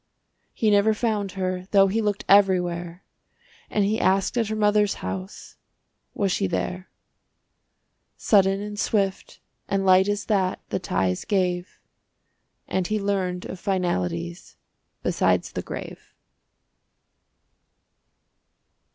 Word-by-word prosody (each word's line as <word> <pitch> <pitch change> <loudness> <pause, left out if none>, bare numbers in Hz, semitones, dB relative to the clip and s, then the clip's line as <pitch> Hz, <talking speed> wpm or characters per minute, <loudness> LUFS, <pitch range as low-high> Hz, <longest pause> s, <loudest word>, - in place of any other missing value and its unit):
He 215 -2 +1
never 205 +1 +4
found 210 -4 -1
her, 185 -1 -3
though 195 -1 +5
he 205 +4 0
looked 205 -2 -2
Everywhere, 180 -3 +2 0.7
And 205 -2 +1
he 215 +3 0
asked 195 +4 +2
at 230 -3 +1
her 215 - -2
mother's 210 -1 +2
house 190 +1 -7 0.6
Was 200 -2 0
she 195 +2 0
there. 180 +1 -3 1.3
Sudden 195 -1 +3
and 205 0 -6
swift 195 -4 -1 0.3
and 195 -1 0
light 190 +1 +5
as 205 0 -1
that 190 -4 0
The - - -1
ties 95 - -1
gave, 180 -2 -1 0.9
And 185 -2 -1
he 215 0 -1
learned 190 -3 -2
of 185 - -7
finalities 90 - -2 0.5
Besides - - +1
the - - -4
grave. - - -9
195 Hz, 115 wpm, -24 LUFS, 180-205 Hz, 1.3 s, though